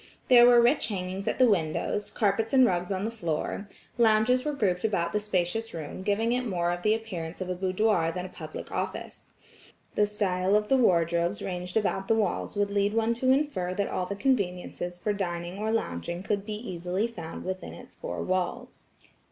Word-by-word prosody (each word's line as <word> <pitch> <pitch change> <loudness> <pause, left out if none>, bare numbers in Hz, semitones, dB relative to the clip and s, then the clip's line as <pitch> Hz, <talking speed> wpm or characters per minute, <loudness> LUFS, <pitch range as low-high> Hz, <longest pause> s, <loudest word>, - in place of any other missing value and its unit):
There 240 -1 +9
were 240 -1 +7
rich 245 +5 +3
hangings 190 -1 -4
at - - 0
the 255 - +6
windows, 190 +1 0
carpets 220 +2 0
and 260 -1 +7
rugs 180 -2 0
on 190 +1 -1
the 225 - -2
floor, 200 0 -3 0.3
lounges 230 +3 +4
were 300 - -1
grouped 190 -9 0
about 170 -6 0
the 210 - +2
spacious 210 +1 -1
room 155 +2 -6
giving 210 +4 +1
it 250 +1 +1
more 175 -6 0
the 215 +3 +3
appearance 180 -7 -6
of 185 -1 -3
a - - +1
boudoir 185 -1 +1
than 180 +1 -4
a - - -7
public - - -8
office. - - -5 0.6
The 210 - +3
style 195 -2 +1
of 210 0 +1
the 270 - +5
wardrobes 170 -4 +2
ranged 180 +1 -3
about 195 -2 0
the 225 - +3
walls 210 -2 -1
would 205 0 0
lead 205 +1 +1
one 225 +1 +2
to 255 +2 0
infer 260 -11 +1
that 200 0 -1
all 180 - -2
the 200 - -3
conveniences 180 -7 -1
for 205 +4 -1
dining 175 -1 -4
or 215 +1 -1
longing 170 - -2
could 200 +1 -2
be 215 - -3
easily 185 -2 -2
found 170 -9 -7
within 185 0 -5
its - - -13
four - - -5
walls. 185 -1 -3
200 Hz, 195 wpm, -28 LUFS, 180-225 Hz, 0.6 s, There